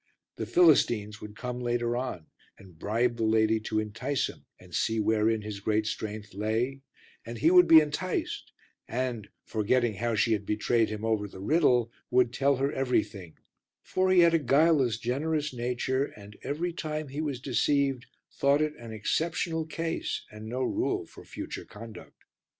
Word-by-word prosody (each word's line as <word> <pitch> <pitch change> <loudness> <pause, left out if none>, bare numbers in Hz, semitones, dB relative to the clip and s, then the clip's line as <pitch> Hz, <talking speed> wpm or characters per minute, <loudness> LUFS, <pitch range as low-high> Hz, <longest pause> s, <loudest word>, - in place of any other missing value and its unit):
The - - -4
Philistines 120 -11 +3
would 105 0 -9
come 125 +1 -5
later 120 -1 -1
on 125 -10 -4 0.3
and 90 -5 -17
bribe 120 +4 0
the 115 - -1
lady 110 0 +3
to 110 0 -3
entice 115 +6 -1
him - - -13
and - - -16
see 110 0 0
wherein 110 0 +2
his 105 -1 -6
great 110 +1 0
strength 105 -1 -5
lay, 110 +7 -1 0.4
and 115 0 -7
he 155 +8 +3
would 180 -1 +7
be 160 -1 +9
enticed 160 +5 -3 0.4
and, 120 -4 -3 0.2
forgetting 115 +2 +1
how 115 +3 -1
she 115 +1 +2
had 105 -2 -1
betrayed 110 +2 +1
him 110 0 -4
over 110 -2 0
the 95 - -12
riddle, 125 - +2 0.2
would 125 -1 +3
tell 140 +2 +2
her 135 +2 0
everything; 105 -9 -2 0.5
for 185 0 0
he 185 -1 +6
had 170 -1 +5
a 165 - +4
guileless, 140 -3 +3
generous 145 +5 -1
nature, 125 +2 -1
and 105 -5 -13
every 170 +4 -2
time 155 -3 -4
he 145 +3 -4
was 145 -5 -3
deceived 135 0 0 0.2
thought 140 +1 +2
it 155 0 -2
an 115 -1 -9
exceptional 160 +8 -1
case 165 +1 -3
and 105 +1 -9
no 125 +3 -2
rule - - -1
for - - -14
future - - -7
conduct. 115 0 -12
120 Hz, 165 wpm, -28 LUFS, 110-140 Hz, 0.5 s, be